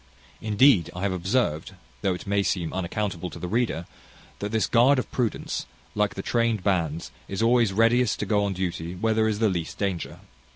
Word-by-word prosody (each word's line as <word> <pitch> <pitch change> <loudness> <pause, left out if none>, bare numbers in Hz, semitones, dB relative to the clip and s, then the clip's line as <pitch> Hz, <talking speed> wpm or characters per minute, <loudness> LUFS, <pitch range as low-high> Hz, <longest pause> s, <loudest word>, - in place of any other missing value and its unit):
Indeed, 105 - +4
I 90 - -5
have 100 - +1
observed, 95 -3 -1 0.3
though 95 -2 +1
it - - -9
may 100 0 +1
seem 90 -4 -1
unaccountable 95 -1 -3
to - - -10
the 90 - -5
reader, 105 -5 0 0.5
that 105 0 -4
this 110 -1 +2
guard 130 +4 +4
of 130 - -3
prudence, 120 -5 -2 0.3
like 105 -1 0
the 95 - -5
trained 115 -4 +1
bands, 85 -5 -1 0.2
is 100 +3 -2
always 115 -2 +4
readiest 115 +4 +3
to - - -1
go 105 -2 +2
on 100 -1 -1
duty 90 -2 -3
where 110 +4 +1
there 110 0 +2
is 110 -2 0
the 110 +1 +3
least 85 -4 -3
danger. 95 -4 -3
100 Hz, 195 wpm, -25 LUFS, 90-115 Hz, 0.5 s, Indeed